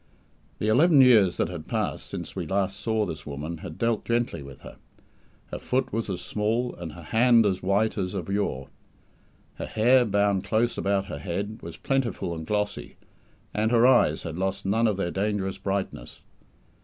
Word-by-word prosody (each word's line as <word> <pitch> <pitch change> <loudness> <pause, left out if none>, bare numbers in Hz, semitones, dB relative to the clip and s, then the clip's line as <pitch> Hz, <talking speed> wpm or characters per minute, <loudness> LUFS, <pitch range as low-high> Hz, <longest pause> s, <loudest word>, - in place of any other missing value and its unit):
The 105 - -2
eleven 145 +7 +5
years 110 -8 +5
that - - 0
had 85 -4 -7
passed - - -2
since - - -7
we - - -4
last 95 0 -1
saw 110 -2 0
this 80 -6 -6
woman 75 +3 -5
had 85 -3 -8
dealt 115 -2 0
gently 120 -9 -1
with 70 -1 -11
her. - - -12 0.7
Her - - -4
foot 130 0 -1
was 115 -1 -2
as 95 - -3
small 115 +4 -1
and 85 -3 -8
her 85 +1 -11
hand 115 +4 +4
as 95 -2 0
white 100 +3 +1
as 95 +1 -3
of 90 -4 -4
yore. 100 -10 -2 0.9
Her - - -5
hair, 125 +4 +4
bound 100 -2 +1
close 110 +4 +1
about 100 0 0
her - - -6
head, 100 +4 -4
was 85 0 -9
plentiful 130 -9 -1
and 80 -1 -7
glossy, 105 -1 -2 0.6
and 110 +1 +1
her 120 0 +4
eyes 120 -12 +4
had 80 +1 -5
lost 95 +1 -2
none 110 +4 +2
of 105 -3 0
their 85 -3 -1
dangerous 95 -1 -2
brightness. 95 -10 -4
100 Hz, 180 wpm, -26 LUFS, 90-115 Hz, 0.9 s, eleven